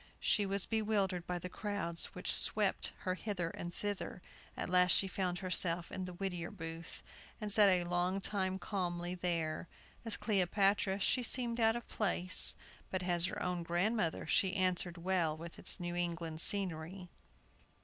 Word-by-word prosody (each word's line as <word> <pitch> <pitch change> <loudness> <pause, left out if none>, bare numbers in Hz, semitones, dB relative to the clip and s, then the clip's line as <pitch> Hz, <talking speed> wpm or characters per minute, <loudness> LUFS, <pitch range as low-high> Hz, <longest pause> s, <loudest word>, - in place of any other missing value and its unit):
She 205 -2 +2
was 195 -1 0
bewildered 205 -5 0
by 180 - -1
the 175 - -5
crowds 180 -4 -2
which - - +1
swept - - +3
her 185 - -1
hither 185 -4 -3
and 175 - -6
thither. 200 -1 -4 0.3
At - - -2
last 180 0 +5
she 195 - +3
found 185 -2 -2
herself 175 -2 +2
in 185 - -4
the 180 - -6
Whittier 175 -2 -3
Booth, 165 -3 -7 0.4
and 210 -2 -3
sat 205 -1 +7
a 180 -2 +3
long 175 +2 0
time 190 -1 -1
calmly 175 -2 -3
there. 170 -3 -2 0.4
As 225 -3 -2
Cleopatra 195 -1 +2
she 250 +6 +2
seemed 240 -1 +2
out 225 0 +4
of 240 - -5
place, 185 -3 +1 0.3
but 185 -1 -2
as 175 -1 +1
her - - -4
own 180 -1 -1
grandmother 175 +2 0
she 190 +4 +2
answered 180 -2 0
well 170 -3 0
with 170 +1 -9
its - - +2
New 175 0 -3
England 170 -2 -2
scenery. 180 -2 0
180 Hz, 160 wpm, -35 LUFS, 175-200 Hz, 0.4 s, sat